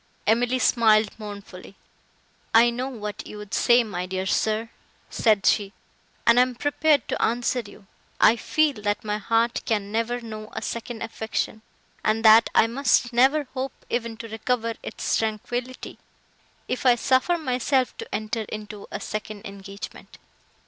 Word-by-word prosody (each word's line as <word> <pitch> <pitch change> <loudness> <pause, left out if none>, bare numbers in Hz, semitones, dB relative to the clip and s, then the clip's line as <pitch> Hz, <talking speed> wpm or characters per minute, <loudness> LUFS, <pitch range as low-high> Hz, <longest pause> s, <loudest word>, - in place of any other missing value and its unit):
Emily 245 +3 +2
smiled 220 -4 +4
mournfully, 200 -2 -9 0.8
"I 235 +1 +7
know 250 +3 -3
what 210 -5 -6
you 210 - -9
would 210 -1 -10
say, 240 0 +4
my 180 -5 -4
dear 190 0 -3
sir," 220 +3 0 0.4
said 215 -4 +2
she, 205 -2 +2 0.5
"and 235 +1 +6
am 250 0 +3
prepared 290 +1 +2
to - - -2
answer 240 +2 +1
you. 205 -2 -11 0.3
I 220 - +6
feel, 290 -1 0
that 205 +2 -1
my 210 0 -2
heart 230 +3 +1
can 205 -3 -1
never 230 +2 -1
know 215 -2 -8
a - - -4
second 235 0 -5
affection; 220 -1 -3 0.4
and 220 +1 +1
that 220 +1 +8
I - - +6
must 245 0 +1
never 270 +5 +4
hope 265 0 -3 0.2
even 230 -1 -2
to 230 - -7
recover 230 +1 -1
its - - -2
tranquillity—if 240 +3 -6
I 250 -2 +6
suffer 260 +8 +2
myself 255 -3 0
to 455 - -6
enter 220 +1 -2
into 210 -1 -7
a - - -4
second 215 -1 -6
engagement." 200 0 -9
225 Hz, 150 wpm, -24 LUFS, 215-245 Hz, 0.8 s, that